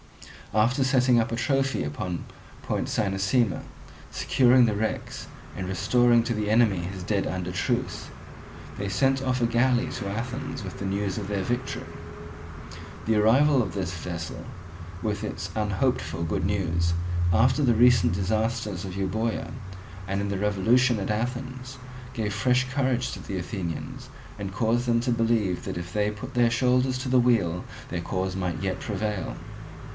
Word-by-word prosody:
After 115 +6 +3
setting 130 -2 +4
up 115 - 0
a - - 0
trophy 135 +2 +1
upon 85 +4 -4 0.4
Point - - -1
Cynossema, 100 +2 +1 0.5
securing 125 -1 +4
the 110 -3 +1
wrecks, 110 +2 -3 0.3
and 95 -1 -4
restoring 120 +5 +3
to 120 - -1
the 105 -1 -1
enemy 110 -4 +4
his 90 +1 -5
dead 100 +1 0
under 90 -1 -3
truce, 90 - -2 0.7
they 100 0 -3
sent 135 +7 +2
off 130 -1 0
a - - +4
galley 120 +1 +2
to 100 -5 -4
Athens 115 +3 -4
with 95 - -7
the 100 - -4
news 100 0 -1
of 100 - -5
their 100 -2 -1
victory. 120 +5 -3 1.2
The 110 - +2
arrival 130 +6 +5
of 95 -7 -3
this 95 -2 -2
vessel 85 -1 -5 0.6
with - - -1
its - - -4
unhoped 110 +4 +1
for 80 +1 -4
good 80 +1 -1
news, 85 -4 +1 0.4
after 125 - +4
the 120 -3 +4
recent 115 -8 +5
disasters 105 0 -1
of 95 -1 -6
Euboea, 110 +4 -1 0.6
and 100 0 -1
in 100 0 -2
the 100 -1 -2
revolution 110 +4 +3
at 100 - -2
Athens, 125 +3 -4 0.4
gave 105 -3 -2
fresh 125 +4 +2
courage 130 -2 0
to - - -7
the 95 - -4
Athenians, 90 -3 -5 0.3
and 100 -1 -4
caused 115 +4 +1
them 115 -1 +3
to 125 +1 0
believe 115 -5 +1
that - - -4
if 90 0 -6
they 105 0 +1
put 105 0 -8
their 120 -1 +4
shoulders 125 +1 +2
to 130 +1 -4
the 130 0 +5
wheel 105 -8 +2 0.3
their 85 -1 -3
cause 95 +1 -2
might 90 -2 -2
yet 95 -1 -1
prevail. 105 -3 -3
110 Hz, 160 wpm, -26 LUFS, 95-125 Hz, 1.2 s, arrival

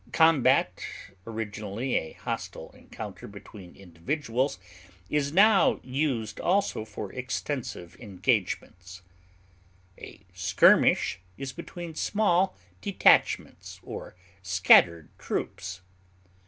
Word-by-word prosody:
Combat, 160 -5 +3 0.4
originally 110 +2 -4
a 80 - -1
hostile - - -6
encounter - - -9
between 100 -2 -12
individuals, 125 - -3 0.5
is 145 -1 0
now 195 +1 +5
used 125 -5 -2
also 185 - 0
for 105 -2 -7
extensive 125 - -5
engagements. 95 -3 -2 1.0
A - - -11
skirmish - - +4 0.2
is 135 -1 -6
between 170 -1 -8
small 190 +1 +1 0.2
detachments 200 -2 +2
or - - -8 0.3
scattered 90 -3 +4
troops. 90 -1 -4
120 Hz, 85 wpm, -27 LUFS, 95-155 Hz, 1.0 s, now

